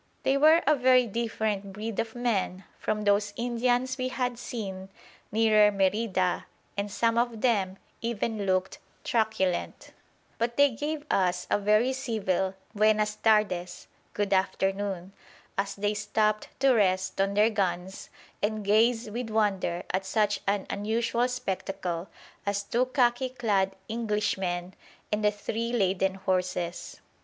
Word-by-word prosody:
They 270 - +3
were 315 +4 +6
a 305 +2 +5
very 255 -1 +5
different 215 -3 -2
breed 215 +1 -4
of 225 0 -2
men 205 -6 -1 0.2
from 210 0 -1
those 205 0 +2
Indians 245 +2 0
we 255 - 0
had 250 -2 -2
seen 195 -6 -6 0.4
nearer 215 -1 +5
Merida, 195 -2 0 0.3
and 200 +1 -2
some 230 +3 +2
of 235 -2 -1
them 195 -6 +1 0.2
even 225 -2 -2
looked 185 0 0 0.2
truculent. 220 -6 -1 0.5
But 235 +1 -1
they 285 -1 +6
gave 295 +5 -4
us 180 -1 +1
a - - +3
very 215 +5 +3
civil 195 -7 -1 0.2
"Buenas 215 0 +2
tardes!" 185 -5 +1 0.3
("Good 205 -1 0
afternoon!") 195 -1 -1 0.4
as 195 0 -2
they 205 +1 0
stopped 210 +1 0
to 270 -1 +5
rest 190 -3 +1
on 195 0 0
their 215 +2 +4
guns 190 -2 -2 0.3
and 215 0 -1
gaze 225 +3 +3
with 230 +2 -4
wonder 195 -5 0
at 190 +1 0
such 210 0 +1
an 200 -1 +1
unusual 230 +4 0
spectacle 195 -7 -3 0.3
as 200 0 -1
two 240 +5 0
khaki 255 -1 +2
clad 205 -6 0
Englishmen 195 -5 -1 0.4
and 210 0 0
the 210 - +5
three 225 +3 -3
laden 190 -4 +1
horses. 180 -2 -2
210 Hz, 135 wpm, -28 LUFS, 195-235 Hz, 0.5 s, were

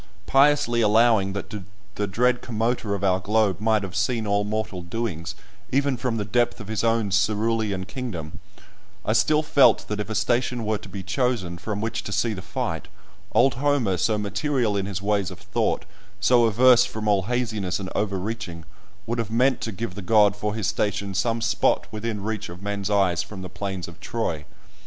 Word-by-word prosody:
Piously 135 -4 +4
allowing 110 -2 +4
that 100 +2 -6 0.4
the 105 0 -2
dread 125 +5 +2
Commoter 115 -2 -1
of 100 - -6
our 95 -1 +3
globe 105 -1 +1
might 110 -1 +2
have 95 -1 -6
seen 110 +3 0
all 100 0 +1
mortal 105 -3 -3
doings, 90 -3 -4 0.4
even 140 0 +2
from 125 -2 -2
the 105 - -2
depth 120 +4 +1
of 105 -2 -9
his 110 0 -1
own 115 -3 +1
cerulean 105 -1 +1
kingdom, 100 - -6 0.7
I - - +2
still 155 0 +3
felt 140 -2 +4
that 105 0 -2
if 105 - -3
a 110 - -3
station 120 +2 0
were 105 -1 0
to - - -12
be 100 -2 -6
chosen 110 -9 -1
from 105 +2 -4
which 110 +1 -2
to - - -5
see 115 +2 +1
the 95 - -6
fight, - - -4 0.5
old 130 +1 +4
Homer, 130 -7 +1
so 110 +2 +1
material 105 +3 0
in 100 -1 -1
his 100 -1 -4
ways 100 -3 +1
of - - -9
thought, - - -1 0.3
so 120 +4 +4
averse 120 +3 +6
from 110 -1 -4
all 100 -2 +3
haziness 110 -6 -1
and 95 -1 -6
overreaching, 100 -4 -3 0.4
would 115 +1 -2
have 115 - -2
meant 125 +3 +2
to 115 - -3
give 110 -1 -5
the 100 - -7
god 105 +1 +4
for 105 +1 -3
his 110 -3 -2
station 100 -1 -1
some 115 +4 0
spot 115 0 +2
within 110 -1 -4
reach 110 -1 -3
of 90 +3 -10
men's 100 -1 -2
eyes 95 -5 +2
from 95 -3 -8
the 90 - -6
plains 95 -1 -4
of 85 -1 -12
Troy. 85 -11 -3
105 Hz, 190 wpm, -24 LUFS, 100-115 Hz, 0.7 s, averse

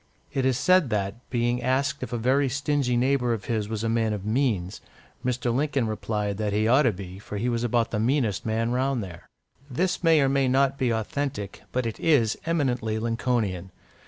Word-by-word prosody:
It 135 -1 +1
is 130 -2 +1
said 185 -4 +4
that, 105 +2 -3
being 120 0 0
asked 130 +3 0
if - - -5
a 120 - -1
very 130 +4 +2
stingy 140 -2 0
neighbour 125 -1 +2
of 105 -4 -5
his 110 -3 -2
was 110 -1 -3
a - - 0
man 115 -1 +1
of 100 -2 -5
means, 110 -6 0 0.4
Mr. 125 -1 0
Lincoln 140 -1 0
replied 105 -2 -2
that 105 -2 -1
he 105 +1 +2
ought 130 +5 +5
to - - +1
be, 95 -1 -9
for 105 0 -7
he 115 +5 -1
was 120 -1 0
about 120 -1 +1
the 105 - -1
meanest 120 -3 +1
man 115 +1 -1
round 130 -1 0
there. 85 -2 -10 0.4
This 175 +8 -1
may 165 -2 +5
or 135 - +3
may 135 0 +2
not 135 +1 +2
be 130 - +1
authentic, 110 -1 -3
but 125 -1 -1
it 115 - -4
is 130 -9 +3
eminently 125 -9 0
Lincolnian. 115 -5 -1
120 Hz, 200 wpm, -26 LUFS, 110-135 Hz, 0.4 s, ought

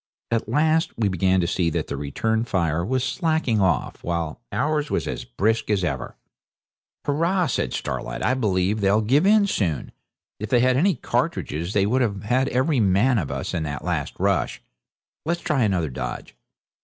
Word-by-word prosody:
At 115 -2 0
last 155 +5 +2
we 110 -3 +1
began 95 0 +2
to 85 - 0
see 85 -1 +1
that 80 -1 -2
the - - -5
return 110 +11 -1
fire 85 -7 0
was 130 +6 0
slacking 135 - 0
off, 80 -9 0
while 85 -2 -3
ours 150 0 0
was - - -1
as - - -4
brisk 110 - 0
as 100 -3 +1
ever. 70 -7 -3 0.9
'Hurrah!' 170 +6 +1
says - - -1
Starlight, 65 - -4
'I 125 - +2
believe 105 -4 0
they'll 100 +2 +3
give 135 - +3
in 210 0 +5
soon. 90 - -1 0.5
If 105 0 -5
they 125 - +4
had 130 0 +3
any 180 +6 +3
cartridges 85 - -2
they 100 -1 +3
would 125 +5 +2
have 100 -5 -1
had 130 +5 +1
every 130 +2 +1
man 105 +5 +3
of 80 - -3
us - - -4
in 85 - -1
that 70 -4 -5
last - - -2
rush. - - 0 0.6
Let's 170 +2 -1
try 150 -5 0
another 90 - +1
dodge. 65 - -6
110 Hz, 180 wpm, -23 LUFS, 90-130 Hz, 0.9 s, in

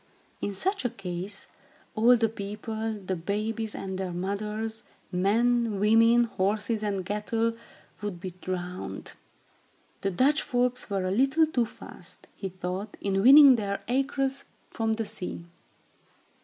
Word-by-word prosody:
In 205 - -2
such 385 - 0
a 245 - +1
case, 195 -2 -5 0.5
all 235 +3 +6
the 225 0 +2
people, 220 +1 -4
the 190 -3 -4
babies 215 +5 -3
and 190 -1 -5
their 190 -2 -3
mothers, 210 +5 -3 0.3
men, 220 +3 +2
women, 230 +3 +5
horses 215 +1 -1
and 200 -3 -2
cattle, 225 +3 -1 0.5
would 205 -4 -4
be 185 +1 -5
drowned. 180 0 -5 0.9
The 195 - 0
Dutch 270 - +3
folks 250 -2 0
were 195 -2 -1
a 185 - 0
little 270 +9 +4
too 250 -7 0
fast, - - -12
he 195 - -5
thought, 185 +3 -5
in 195 -1 0
winning 275 +2 +9
their 200 -2 -3
acres 270 +2 0 0.3
from 225 -1 0
the 225 0 -2
sea. 180 -4 -4
215 Hz, 135 wpm, -27 LUFS, 195-235 Hz, 0.9 s, winning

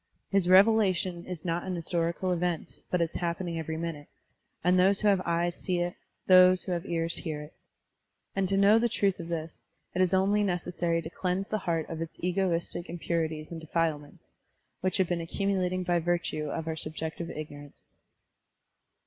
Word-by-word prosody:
His 195 -3 +2
revelation 185 -3 +4
is 180 -3 -6
not 170 0 0
an 185 -1 -3
historical 170 +2 -1
event, 175 -2 -2
but 180 - +1
it 165 - -3
is - - -5
happening 170 -1 -2
every 160 0 -4
minute, 160 -3 -5 0.6
and 180 +1 +4
those 195 +2 +4
who 210 - +2
have 195 -2 +4
eyes 170 +1 +1
see 180 -2 -2
it, 175 0 -1 0.3
those 185 0 +7
who 185 - -4
have 175 -1 -2
ears 165 0 -1
hear 155 -4 -4
it. 150 - -13 0.8
And 195 -1 +1
to 195 - +2
know 205 +3 +6
the 240 +1 +2
truth 200 -4 +1
of 165 - -6
this, 165 -1 -5 0.3
it 185 - +1
is 185 -2 +3
only 195 +2 +3
necessary 175 -3 -1
to 160 - -6
cleanse 185 +2 -2
the 215 - 0
heart 165 -2 0
of 165 -1 -5
its 165 - -6
egoistic 175 -1 -1
impurities 165 -2 -2
and 165 -1 -6
defilements, 160 -2 -2 0.5
which 185 0 0
have 190 -2 +2
been 175 -1 -1
accumulating 185 +1 -1
by 175 -1 +2
virtue 170 -2 -1
of 160 +1 -4
our 160 - -1
subjective 160 +2 -4
ignorance. 145 -2 -9
175 Hz, 180 wpm, -29 LUFS, 165-185 Hz, 0.8 s, those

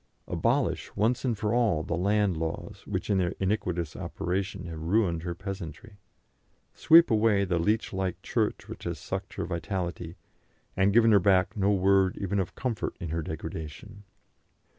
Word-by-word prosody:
Abolish - - 0
once 115 +4 +1
and 120 -5 0
for 105 +2 -1
all 110 -10 +2
the 85 - -2
land 100 +1 +2
laws, 80 0 -4
which - - -2
in 100 - +3
their 90 -2 0
iniquitous 90 -5 -1
operation 95 0 -3
have 80 -2 -7
ruined 85 -1 +1
her 85 0 -4
peasantry. 100 +2 -8 0.7
Sweep 165 -2 +6
away 105 -2 +3
the 90 -2 0
leech 105 +6 0
like 95 -2 -2
Church - - -1
which - - -9
has - - -3
sucked - - -5
her - - -3
vitality, 85 0 -4 0.6
and 95 +1 +3
has - - 0
given 115 0 +6
her 105 - +7
back 95 0 +3
no 100 -1 +2
word 95 -1 +3
even 100 0 -1
of 95 - -3
comfort 115 -4 -3
in 85 -4 -5
her 80 +1 -1
degradation. 80 +6 -7
95 Hz, 165 wpm, -28 LUFS, 85-105 Hz, 0.7 s, her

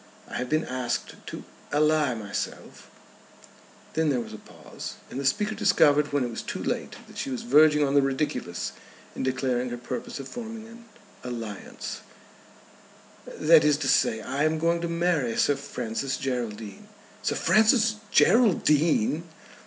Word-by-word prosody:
I - - -5
have 125 0 -3
been 155 +1 +1
asked 125 -2 -3
to - - -7 0.3
ally 150 -3 +2
myself 105 -3 -6 0.5
;" - - -24
then 160 -1 +1
there 130 -3 +1
was 120 - -7
a 110 - -8
pause, - - -9 0.2
and 130 - -4
the 140 - -3
speaker 210 +11 +1
discovered 145 -7 +3
when 145 -2 +1
it 120 - -3
was 115 - -5
too - - -5
late - - -3
that - - -10
she - - -3
was 130 -2 -4
verging 150 +3 +5
on 135 - -1
the 140 - +6
ridiculous 135 - -2 0.4
in - - -4
declaring 130 -1 0
her 120 - -4
purpose 125 +3 -6
of 135 - -7
forming 225 - -7
an 230 +1 -14 0.4
alliance; 115 -5 -6 1.3
"that 160 0 +5
is 150 -1 +4
to 145 -3 -2
say, 110 -4 +3
I 135 +5 -2
am 155 +1 +2
going 170 +1 +1
to 170 - -1
marry 170 -8 0
Sir 145 - +3
Francis 130 +2 -3
Geraldine." 115 -6 -4 0.3
"Sir - - -1
Francis 220 0 +4
Geraldine!" 165 - +3
145 Hz, 160 wpm, -26 LUFS, 125-160 Hz, 1.3 s, the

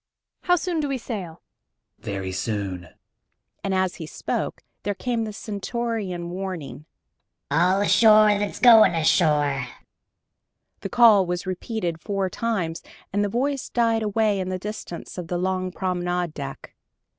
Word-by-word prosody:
How 355 - +5
soon 350 -1 -2
do 290 -2 -1
we 270 - -1
sail?" 190 -9 -6 0.6
"Very 95 -2 -4
soon," 95 -2 -3 0.8
and 195 - -1
as 185 -1 0
he 160 - -7
spoke - - -4 0.2
there 205 0 -2
came 235 +1 -1
the 215 - -5
stentorian 205 -4 -4
warning: 180 -6 -6 0.7
"All 185 +4 +3
ashore 215 0 +6
that's 205 -1 -3
going 225 -7 +7
ashore!" 150 -5 +2 1.1
The 195 - -5
call 215 -4 +6
was 180 +2 -3
repeated 185 -3 -3
four 195 -3 -2
times, 190 -8 -2 0.3
and 205 +1 +2
the 205 - 0
voice 270 +5 -1
died 230 -2 +2
away 215 -1 +1
in 185 0 -3
the 185 - -2
distance 190 -3 -7
of 175 - -6
the 175 - -2
long 185 0 -1
promenade 180 -2 -2
deck. 140 -2 -7
190 Hz, 140 wpm, -24 LUFS, 170-220 Hz, 1.1 s, going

